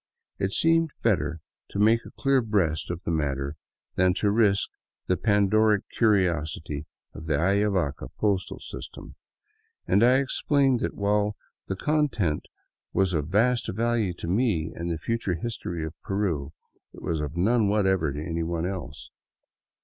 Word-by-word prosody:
It 95 - 0
seemed 165 +5 +3
better 80 -7 +1 0.3
to - - -6
make 110 +3 +4
a - - -16
clear 135 -2 +3
breast 95 -9 0
of 85 0 -4
the - - -2
matter 70 -2 -1 0.4
than 90 0 +3
to 100 0 +1
risk 105 -2 +3 0.4
the 90 - +2
Pandoric 105 +1 +3
curiosity 80 -8 +1 0.3
of 80 +1 -9
the 80 - +2
Ayavaca 95 -2 +1
postal 100 -3 0
system, - - -9 0.7
and 105 - +3
I 125 +2 +6
explained 135 -1 +2
that, - - -2
while 105 +1 +1 0.3
the 95 - -2
contents 120 - 0 0.4
was 95 0 +2
of 75 -3 -1
vast 115 +7 +2
value 115 -2 0
to 85 - -7
me 90 -4 +1
and 85 +1 -4
the 85 - -1
future 105 +1 -1
history 85 -4 -4
of 80 - -6
Peru, 85 -8 -1 0.4
it - - -12
was 80 -2 -1
of 75 +2 -5
none 110 +4 +3
whatever 95 -6 +2
to 70 - -5
anyone 85 0 -2
else. 90 -6 -6
95 Hz, 150 wpm, -26 LUFS, 80-110 Hz, 0.7 s, I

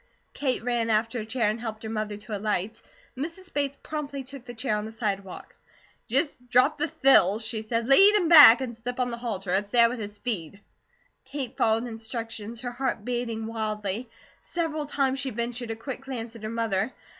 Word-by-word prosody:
Kate 260 -5 -1
ran 240 -2 0
after 225 +2 +1
a 215 - -5
chair, 230 -1 0
and 215 +2 -1
helped 220 -2 -6
her - - -4
mother 215 -1 -3
to 210 +1 -6
alight. 210 +1 -2 0.3
Mrs. 335 +7 -7
Bates 280 -1 -1
promptly 285 -3 -5
took 265 -1 -11
the 240 - -8
chair, 225 -2 -1
on 210 0 -3
the 220 - -7
sidewalk. 200 -4 -4 0.5
"Just 255 0 0
drop 255 +5 +3
the 300 - +1
thills," 255 - +4
she 220 0 -1
said. 230 +1 -2
"Lead 390 - +7
him 380 -5 +3
back 290 -7 +10
and 245 -3 -4
slip 245 +2 -6
on 250 -1 0
the 235 - -4
halter. 200 -6 -3
It's 200 +1 +1
there 235 +1 +5
with 245 0 -5
his 205 -1 -6
feed." 200 -6 -4 0.7
Kate 270 -3 -5
followed 225 0 +2
instructions, 225 -1 -5
her 245 - -4
heart 245 -4 -3
beating 240 -2 -2
wildly. 215 0 -3 0.3
Several 315 -3 -3
times 270 -2 0
she 275 -1 -2
ventured 235 +1 -4
a 225 - -2
quick 255 +3 -6
glance 240 -4 -6
at 230 - -11
her 215 - -4
mother. 225 -1 -1
235 Hz, 195 wpm, -26 LUFS, 220-265 Hz, 0.7 s, back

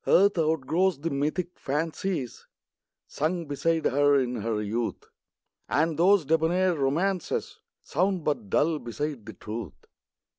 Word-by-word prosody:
ARTH 200 +2 +5
outgrows 160 +3 +1
the 165 - -2
mythic 155 +6 -2
fancies 155 -1 -3 0.6
Sung 165 +3 -2
beside 160 +3 0
her 145 +1 +4
in 125 -1 -1
her 110 0 -1
youth; 110 +3 -2 0.7
And 160 +2 +2
those 180 +1 +4
debonair 165 +5 +2
romances 165 +6 -1 0.2
Sound 185 +2 0
but 125 -10 -2
dull 155 +6 +2
beside 125 -1 -5
the 110 - -7
truth. 105 - -6
155 Hz, 120 wpm, -27 LUFS, 130-170 Hz, 0.7 s, ARTH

